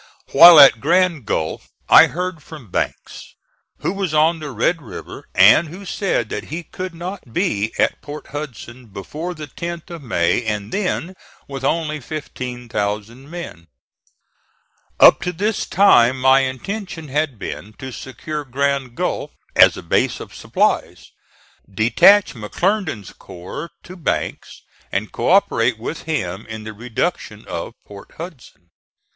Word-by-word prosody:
While 165 +2 +10
at 135 -5 +8
Grand 170 - +2
Gulf 80 0 -3 0.2
I - - +8
heard 180 -1 -4
from 145 - -12
Banks, - - -4 0.5
who - - -1
was 195 -6 -2
on 160 +2 +3
the 150 -1 -6
Red 140 +7 0
River, 120 - -10
and 105 - +6
who 185 +6 -10
said 180 - -1
that 105 - -5
he 165 +4 -6
could 185 +2 -7
not 175 -6 -7
be 110 - 0
at - - +1
Port 150 0 -9
Hudson 130 -4 -8
before 150 - -6
the 155 -1 -7
10th 170 +4 -7
of 170 -2 -7
May 110 -4 0
and 105 -1 -3
then 185 -2 -2 0.3
with 135 -1 -7
only 155 +1 -1
15,000 120 -4 -5
men. 165 - -8 1.3
Up - - +8
to 180 - -2
this 205 +5 -2
time 130 -10 +5
my 130 +1 +5
intention 160 - -4
had 145 -2 -1
been 105 +1 -7
to 130 +4 -8
secure 150 +4 -6
Grand 135 -1 -1
Gulf, - - -2 0.3
as - - +6
a - - -8
base - - 0
of - - -10
supplies, - - -1 0.6
detach 120 - +5
McClernand's 155 - -2
corps 90 - -9
to 185 - -11
Banks 170 - -4 0.3
and 100 +2 -2
co - - -2
operate 125 - +3
with 120 +8 -6
him 105 - -3
in 110 -1 -7
the 110 0 -7
reduction 115 +2 -4
of - - -5
Port 100 -1 -13
Hudson. 130 - -11
140 Hz, 140 wpm, -20 LUFS, 115-170 Hz, 1.3 s, While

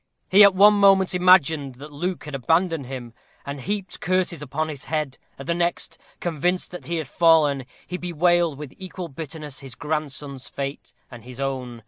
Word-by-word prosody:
He 200 +3 +8
at 200 -2 +7
one 205 +2 +7
moment 195 -2 +4
imagined 160 -7 +4
that 145 +4 -11
Luke 180 +5 -3
had 150 - -8
abandoned 160 +2 +1
him, 125 -3 -7 0.3
and 140 -1 -6
heaped 195 +3 -4
curses 185 -3 0
upon 150 +2 -2
his 150 -2 -7
head; 150 -5 -3 0.2
at 135 - -9
the 170 - 0
next, 170 0 -2 0.2
convinced 175 +2 -1
that 180 - -9
he 170 - -3
had 160 -4 -3
fallen, 150 -3 +3 0.2
he 180 - -5
bewailed 175 -2 +1
with 145 -2 -8
equal 185 -2 -7
bitterness 150 -1 -8
his 135 -3 -9
grandson's 145 -3 -4
fate 140 0 -6 0.2
and 120 -3 -11
his 125 +1 -11
own. 130 -3 -3
155 Hz, 175 wpm, -23 LUFS, 135-180 Hz, 0.3 s, He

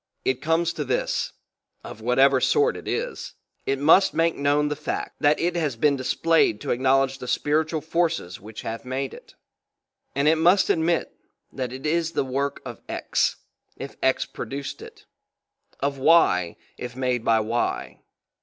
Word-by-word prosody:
It 130 0 0
comes 165 +2 +1
to 150 - -3
this: 130 -2 -1 0.5
of 110 - -10
whatever 130 +3 +4
sort 445 +2 +3
it - - -9
is, 485 +2 -4 0.3
it 135 - +1
must 160 +7 +5
make 165 +1 +2
known 145 +1 +1
the 150 - -2
fact 150 +1 -4
that 150 0 +3
it 175 +1 0
has 155 -7 -1
been 140 +5 +2
displayed 135 -2 +2
to - - -3
acknowledge 135 +2 +2
the 125 - -7
spiritual 155 +4 0
forces 160 - -1
which 105 +2 -9
have 115 0 -5
made 130 +1 -3
it; - - -14 0.8
and 140 +2 +1
it 160 +1 +4
must 180 +4 +4
admit 165 +1 0 0.4
that 130 -2 -4
it 130 +3 -8
is 165 +1 0
the - - 0
work 140 +2 -2
of - - -8
X, - - 0 0.4
if - - -8
X - - +2
produced 140 0 -6
it; - - -13 0.8
of 140 0 -1
Y, 130 - +4 0.2
if 125 0 -6
made 125 -2 -1
by 115 -1 +3
Y. 115 +2 -2
140 Hz, 165 wpm, -24 LUFS, 130-160 Hz, 0.8 s, must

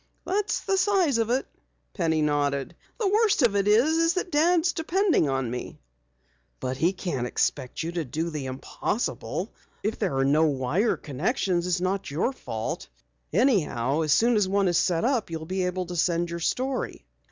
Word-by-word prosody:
"That's 405 +2 0
the 390 -1 +1
size 370 - +2
of 225 0 0
it," 255 +2 +1 0.5
Penny 160 -5 +1
nodded. 145 -2 0 0.2
"The 435 - +1
worst 415 - +3
of 225 -4 +3
it 200 0 +1
is 320 - +3
that 365 0 -2
Dad's 335 +3 +3
depending 350 - +2
upon 135 -3 -1
me." 125 - -6 0.8
"But 130 0 -3
he 170 +5 +3
can't 175 -10 -3
expect 125 +3 -1
you 165 - -3
to 170 -1 -2
do 160 +5 -3
the 145 -4 -4
impossible. 130 - -3 0.3
If 215 +2 -2
there 185 -11 0
are 135 - +2
no 150 +4 +4
wire 150 - +1
connections 175 - -1
it's 180 0 +1
not 190 +1 -1
your 170 - 0
fault. - - -5 0.4
Anyhow, 150 - +2
as 155 -2 0
soon 235 +7 +4
as 200 -3 +2
one 200 0 +2
is 175 -2 +3
set 175 +2 +1
up 250 -6 +1
you'll 160 -1 -5
be 185 +1 -1
able 180 0 -2
to 175 +1 -6
send 170 0 +1
your 170 - -4
story." 255 +9 -2
185 Hz, 175 wpm, -26 LUFS, -, 0.8 s, no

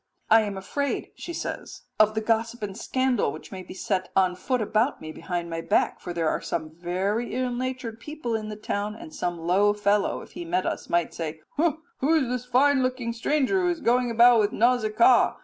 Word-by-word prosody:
"'I 225 0 +8
am 205 -2 -3
afraid,' 280 +9 -3
she 345 - -7
says, 335 - -6 0.2
'of 215 0 +5
the 220 - 0
gossip 225 +1 0
and 195 -2 -4
scandal 255 - 0
which 155 - -10
may 190 -1 -6
be 185 - -10
set 185 0 -2
on 185 -1 +3
foot 255 +7 -1
about 220 +4 +1
me 155 - -7
behind 175 +1 -4
my 165 0 -4
back, - - +1
for 175 - -6
there 170 -2 -1
are - - 0
some 155 -2 -3
very 185 +8 -2
ill 255 0 0
natured 250 -2 -4
people 295 -2 -5
in 215 -1 -3
the 210 - -5
town, 210 0 -3
and 315 +6 -11
some 175 -10 -2
low 185 +5 +3
fellow, 205 0 +1
if - - -13
he - - -7
met 175 +2 -1
us, - - -3
might 170 -1 +1
say, 160 -1 -5 0.2
'Who 320 -1 0
is 290 -6 +2
this 250 0 -2
fine 265 +2 +4
looking 255 -2 -1
stranger 295 +9 +1
who 360 - +2
is 345 -1 -1
going 245 -1 +2
about 235 +1 +6
with 210 -1 +2
Nausicaa? 235 0 +4
220 Hz, 210 wpm, -26 LUFS, 190-255 Hz, 0.2 s, I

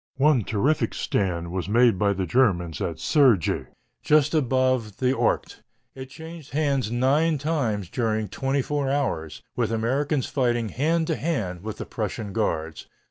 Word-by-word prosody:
One 140 -4 +4
terrific 115 +5 0
stand 85 -4 -1
was 95 0 -3
made 115 -3 +4
by 100 -1 +2
the 95 -1 -2
Germans 90 -6 +1
at 85 - -2
Sergy, 125 - +3 0.4
just 150 -1 +3
above 130 -6 +1
the 130 0 +2
Ourcq. - - 0 0.4
It 130 -1 -9
changed 160 +1 -10
hands 140 -6 +1
nine 140 +7 +2
times 135 - -1
during 110 0 -1
twenty 135 +7 -1
four 145 -1 -1
hours, 110 - -2
with - - 0
Americans 130 +5 0
fighting 120 -4 0
hand 160 +7 +1
to 160 - -1
hand 105 - -2
with 110 +1 -6
the - - -5
Prussian 105 -1 -4
guards. 80 -8 -2
125 Hz, 150 wpm, -25 LUFS, 105-140 Hz, 0.4 s, One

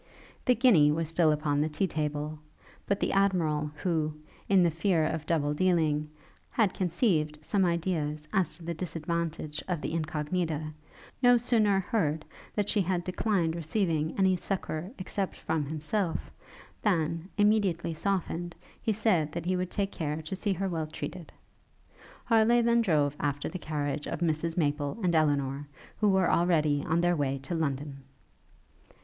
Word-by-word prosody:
The 250 - +4
guinea 200 - +5
was 160 +1 -1
still 165 -1 +3
upon 150 -1 +1
the 155 - +1
tea 175 +6 0
table; 150 -2 -3 0.5
but 200 0 +1
the - - 0
Admiral, 165 -7 +2
who, 160 -4 0 0.3
in 195 -2 +6
the 170 - +3
fear 165 0 +1
of 155 -1 -3
double 145 -3 +1
dealing, 155 -3 +1 0.4
had 210 -5 +2
conceived 165 -5 +1
some 195 -3 +2
ideas 160 -3 -1 0.3
to 175 - -12
the 170 +1 -3
disadvantage 165 -2 -3
of 180 -3 -1
the 155 - -4
Incognita, 155 0 -2 0.5
no 245 -1 +6
sooner 220 -5 +2
heard 160 -7 -1 0.3
that 205 -1 0
she 205 - +2
had 180 -1 0
declined 180 -2 0
receiving 165 -2 -1
any 190 -1 +4
succour 180 -2 -3
except 190 +1 -3
from 160 -3 -2
himself, 160 +4 -2 0.5
than, 165 -3 0
immediately 205 -6 +2
softened, 175 -1 -2 0.3
he 225 - +1
said 195 -8 +2
that 170 - -4
he 185 +1 +1
would 180 0 -2
take 200 0 -1
care 150 -2 -3
to 155 +5 -4
see 200 +1 0
her 195 +2 -2
well 165 -4 -2
treated. 160 +2 -7 0.9
Harleigh 230 +1 +4
then 235 0 +4
drove 150 -8 +2
after 145 -1 -1
the 185 - -6
carriage 145 -2 -3
of - - -4
Mrs 165 0 0
Maple 145 0 0
and 175 -2 +2
Elinor, 145 -3 +1 0.3
who 210 - +4
were 190 -2 +3
already 155 -4 +2
on 165 +2 +2
their 175 0 +3
way 140 -3 0
to 140 - -4
London. 140 -3 -2
165 Hz, 155 wpm, -29 LUFS, 150-190 Hz, 0.9 s, in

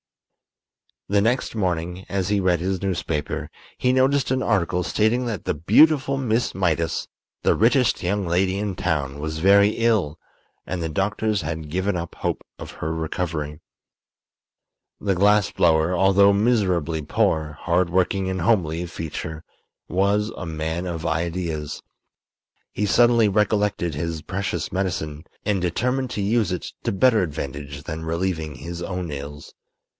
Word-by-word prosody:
The 100 0 +3
next 120 +5 0
morning, 90 -2 -2
as 95 -1 -1
he 105 -1 +2
read 90 -3 +2
his 95 0 -1
newspaper, 85 -6 -2 0.3
he 125 - +2
noticed 130 +1 +2
an 130 0 +1
article 90 -6 +1
stating 110 +7 +1
that 110 -5 -3
the - - 0
beautiful 135 - +4
Miss 120 -3 0
Mydas, 85 -3 0 0.4
the - - +4
richest 125 -1 +3
young 100 +2 0
lady 95 +3 +1
in 100 -2 -2
town, 75 -6 -1
was 80 +1 -4
very 100 +3 +5
ill, 110 -10 +1 0.5
and 90 -1 -3
the 80 - -2
doctors 105 +5 0
had 80 -2 -5
given 95 +3 0
up 85 0 -6
hope - - -2
of - - -8
her 80 +1 -2
recovery. 80 -2 -3 1.4
The 100 -1 +1
glass 100 +2 +3
blower, 80 +1 +3
although 100 +2 +5
miserably 95 -8 +1
poor, 75 0 0
hard 85 +1 +1
working 95 +1 +1
and 95 -1 -2
homely 85 -5 +1
of 85 - -7
feature, 80 -1 -6 0.5
was 100 +4 +1
a - - -5
man 80 +2 -3
of 85 -2 -4
ideas. 80 -2 -2 0.9
He 105 - -1
suddenly 120 +1 +5
recollected 105 -5 +1
his 80 +1 -3
precious 100 +1 -3
medicine, 85 -5 -3 0.2
and 100 -3 +1
determined 125 +9 0
to 105 - -2
use 105 -2 +1
it 90 - -5
to - - 0
better 115 +3 +4
advantage 70 -3 -5
than 80 +1 -5
relieving 80 -2 -2
his 85 +6 -7
own 90 -2 -4
ills. 70 +1 -7
90 Hz, 145 wpm, -23 LUFS, 80-105 Hz, 1.4 s, very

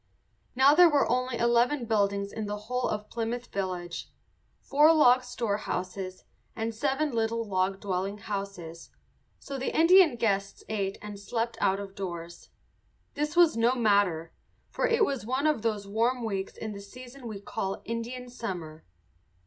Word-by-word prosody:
Now 270 +3 +6
there 350 +2 +7
were 290 -2 +3
only 255 0 0
eleven 240 +3 +2
buildings 200 -2 0
in 220 -2 -4
the 205 0 -3
whole 245 +4 -2
of 210 0 -3
Plymouth 235 +1 -3
village, 180 -3 -4 0.5
four 300 +3 +5
log 255 -5 +6
storehouses 200 -6 -3 0.3
and 225 0 -2
seven 280 +5 0
little 230 -1 -1
log 190 0 0
dwelling 195 +1 -2
houses; 195 -5 -6 0.5
so 275 -1 -7
the 260 - -2
Indian 340 -3 +7
guests 200 -4 -1
ate 200 -3 -2
and 205 -1 -7
slept 230 +3 -2
out 195 +1 +2
of 200 -1 -7
doors. 170 -3 -7 0.6
This 300 +1 -2
was 345 -5 +6
no 235 +2 +3
matter, 200 -8 +2 0.4
for - - 0
it 460 -2 +3
was 275 - -3
one 260 +6 -1
of 305 -7 +2
those 210 -3 -2
warm 235 +4 0
weeks 195 -3 -3
in 220 - -5
the 200 -1 -7
season 250 +4 -11
we 215 -3 -6
call 195 -1 -4
Indian 235 +2 -4
summer. 180 -10 -6
225 Hz, 155 wpm, -28 LUFS, 200-250 Hz, 0.6 s, there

